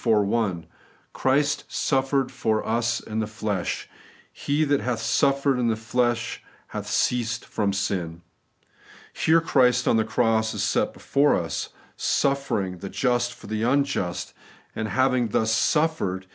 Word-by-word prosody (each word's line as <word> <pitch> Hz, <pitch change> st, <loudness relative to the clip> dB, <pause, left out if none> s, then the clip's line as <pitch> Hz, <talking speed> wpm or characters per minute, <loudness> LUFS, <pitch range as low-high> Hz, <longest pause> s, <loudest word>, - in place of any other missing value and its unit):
iv. -, -, -5 dB, 0.2 s
1): 100 Hz, -6 st, -1 dB, 0.2 s
' -, -, -34 dB
Christ 145 Hz, +2 st, +1 dB
suffered 135 Hz, -1 st, 0 dB
for 110 Hz, -1 st, -1 dB
us 120 Hz, +1 st, 0 dB
in 110 Hz, 0 st, -4 dB
the 110 Hz, -, -1 dB
flesh;... 105 Hz, -4 st, -3 dB, 0.5 s
he 145 Hz, +2 st, 0 dB
that 145 Hz, -2 st, +1 dB
hath 125 Hz, -3 st, -1 dB
suffered 135 Hz, +3 st, +2 dB
in 120 Hz, -, +1 dB
the 115 Hz, -, +2 dB
flesh 120 Hz, +1 st, -1 dB, 0.3 s
hath -, -, -5 dB
ceased 115 Hz, -1 st, 0 dB
from 100 Hz, -2 st, -1 dB
sin.' 85 Hz, -4 st, -3 dB, 0.9 s
Here 165 Hz, +1 st, +3 dB
Christ 125 Hz, -7 st, +3 dB
on 115 Hz, -, +4 dB
the 110 Hz, -, +3 dB
cross 110 Hz, 0 st, +1 dB
is -, -, -1 dB
set -, -, +1 dB
before 140 Hz, +1 st, +2 dB
us, -, -, -3 dB, 0.3 s
suffering 120 Hz, -10 st, 0 dB
the 100 Hz, -, -6 dB
just 120 Hz, 0 st, 0 dB
for -, -, -15 dB
the 110 Hz, +1 st, -3 dB
unjust; 120 Hz, -8 st, 0 dB, 0.4 s
and 110 Hz, -, -2 dB
having 130 Hz, 0 st, +2 dB
thus 110 Hz, +1 st, +1 dB
suffered. 115 Hz, -, +1 dB
120 Hz, 145 wpm, -25 LUFS, 110-135 Hz, 0.9 s, on